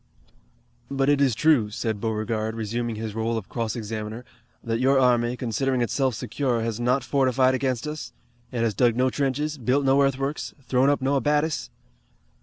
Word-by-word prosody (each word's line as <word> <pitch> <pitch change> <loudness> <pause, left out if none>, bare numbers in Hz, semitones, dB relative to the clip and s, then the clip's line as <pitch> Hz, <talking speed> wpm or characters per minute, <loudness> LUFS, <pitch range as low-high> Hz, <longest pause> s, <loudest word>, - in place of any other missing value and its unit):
"But 135 0 +1
it 145 -1 +3
is 130 -5 +3
true," 140 -6 +3
said 110 -1 -3
Beauregard, 110 0 -2
resuming 115 +1 -3
his 110 -1 -5
role 115 +1 -1
of 110 - -6
cross 115 -3 -3
examiner, 110 +1 -5 0.4
"that 115 0 -1
your 135 +2 +3
army, 120 -1 +2
considering 125 +2 -1
itself 130 +1 0
secure, 125 +1 -1
has 115 -1 -3
not 125 +2 +1
fortified 130 -1 +2
against 130 0 -1
us? 150 0 -5 0.4
It 120 -2 -2
has 115 -2 +1
dug 120 0 +3
no 130 +1 +2
trenches, 145 +2 -1
built 130 +4 +1
no 135 +1 +4
earthworks, 135 +1 -1
thrown 130 +2 +2
up 145 -2 +1
no 140 +1 +2
abatis!" 150 +3 0
125 Hz, 170 wpm, -25 LUFS, 115-135 Hz, 0.4 s, no